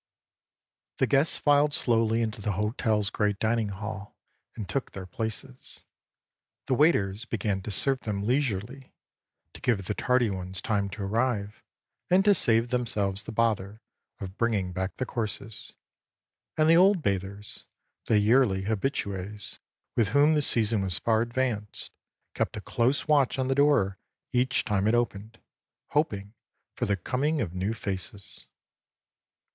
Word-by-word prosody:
The - - +3
guests 140 +3 +2
filed 145 0 +3
slowly 115 -1 +2
into 110 -1 -4
the 100 0 -1
hotelâs 105 +1 0
great 105 -2 0
dining 110 0 0
hall 105 0 -7 0.4
and 105 -4 -6
took 135 - -3
their 95 -1 -7
places, 110 +7 -6 0.8
the - - 0
waiters 120 - +2
began 105 -4 -2
to 100 - -7
serve 135 +6 +3
them 100 -4 -3
leisurely, 125 +1 -2 0.6
to - - -12
give 105 -7 0
the 105 - -1
tardy 125 -1 +1
ones 95 0 -4
time 100 -2 -1
to 100 +1 -6
arrive 105 0 -1 0.5
and 185 +2 +4
to 205 - +7
save 115 - +3
themselves 105 -6 0
the - - -6
bother 110 -2 0 0.4
of 95 0 -8
bringing 105 -6 0
back 95 +2 -3
the 130 - -2
courses; 110 -2 -5 0.8
and 155 0 +4
the 165 - +6
old 185 -1 +5
bathers, 100 0 -3 0.4
the 110 - +3
yearly 105 -2 +3
habitues, 105 -2 -3 0.4
with 115 -3 +3
whom 145 +6 +4
the 150 - +2
season 110 -6 +2
was 95 -2 -1
far 110 -1 +2
advanced, 120 -3 -3 0.4
kept - - -2
a - - -5
close 130 +6 0
watch 145 -4 +3
on 130 0 -1
the - - +3
door 135 -10 +3 0.3
each 125 +1 +1
time 105 -2 +1
it 110 - +3
opened, 115 -1 -2 0.5
hoping 105 -9 -1 0.4
for - - -2
the 100 -1 +1
coming 145 - -1
of 95 - -2
new 95 +5 -2
faces. 100 -1 -6
110 Hz, 145 wpm, -27 LUFS, 100-130 Hz, 0.8 s, to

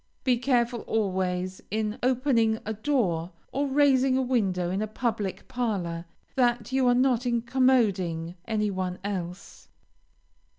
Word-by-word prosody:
Be 250 -3 +2
careful 240 -2 +1
always 185 -3 -1
in 215 +2 -2
opening 245 -3 +2
a 220 - -2
door 205 - 0 0.2
or 280 +2 0
raising 270 -2 +3
a - - +2
window 190 -8 0
in 195 +2 -1
a 215 - -1
public 215 -3 -3
parlor, 190 -9 -2 0.3
that 245 -1 +1
you 260 -1 +2
are 245 - +5
not 250 -1 +2
incommoding 230 -9 +1
any 210 -2 0
one 185 -1 -3
else. 185 -3 -6
225 Hz, 130 wpm, -27 LUFS, 185-255 Hz, 0.3 s, are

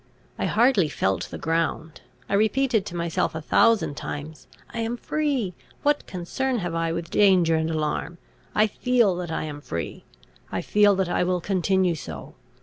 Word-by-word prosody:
I - - 0
hardly 225 - +3
felt 95 -8 -1
the - - -6
ground; 160 -1 -2 0.3
I - - -4
repeated 220 +2 +2
to 175 - -6
myself 170 -2 -1
a - - -2
thousand 225 -1 +3
times, 150 +2 -7 0.3
"I 235 - -4
am 230 +1 -2
free. 275 -10 -1 0.3
What 295 0 +1
concern 245 +9 -2
have 175 -5 -3
I 165 0 0
with 165 0 -4
danger 185 -5 +4
and 160 0 0
alarm? 160 +2 -2 0.4
I 215 - +5
feel 230 -2 +2
that 180 -2 -4
I - - -2
am 145 -1 -6
free; 85 -10 -5 0.5
I - - -2
feel 205 -1 +4
that 190 -2 0
I 175 - +1
will 180 0 +1
continue 185 0 +1
so. 80 - -8
180 Hz, 170 wpm, -25 LUFS, 160-220 Hz, 0.5 s, I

